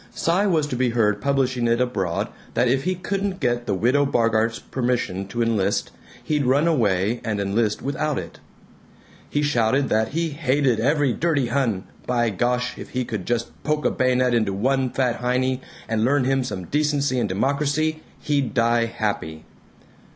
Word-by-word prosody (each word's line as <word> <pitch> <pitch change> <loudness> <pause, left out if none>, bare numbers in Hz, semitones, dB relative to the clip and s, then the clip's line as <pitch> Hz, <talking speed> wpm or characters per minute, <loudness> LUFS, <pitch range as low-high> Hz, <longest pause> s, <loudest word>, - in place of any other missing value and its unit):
Cy 185 +5 +1
was 160 -6 +2
to 145 - -4
be 125 0 +1
heard 105 -3 +1
publishing 130 -3 +1
it 115 +1 +2
abroad 100 -9 -1 0.3
that 125 - +3
if 135 +4 +1
he 185 0 +1
couldn't 195 +1 -3
get 120 -3 -1
the 100 - +1
Widow 125 +8 +3
Bogart's 115 -4 +1
permission 120 -7 -2
to 115 +4 -1
enlist, 105 -4 0 0.3
he'd 150 -2 0
run 140 +5 +3
away 110 - +1
and 105 -2 -2
enlist 105 +2 0
without 150 +1 -1
it. - - -7 0.9
He 145 - 0
shouted 135 -1 +2
that 110 0 +2
he 165 +6 -1
"hated 140 -5 +1
every 145 +1 +2
dirty 145 -6 0
Hun; 120 -7 0 0.2
by 120 -2 +1
gosh, 125 +4 -1
if - - -8
he 125 -1 -2
could 110 -7 -5
just 120 -1 -1
poke 150 -2 -1
a - - +3
bayonet 125 -1 +2
into 110 -4 +1
one 130 +6 +1
big - - -10
fat 125 -3 +1
Heinie 125 +1 0 0.3
and 110 -1 0
learn 140 +3 +3
him 135 +1 +1
some 95 -8 -5
decency 145 - +1
and - - 0
democracy, 145 +8 0 0.2
he'd 140 -4 -1
die 115 0 +3
happy." 100 -9 -3
125 Hz, 175 wpm, -23 LUFS, 115-140 Hz, 0.9 s, that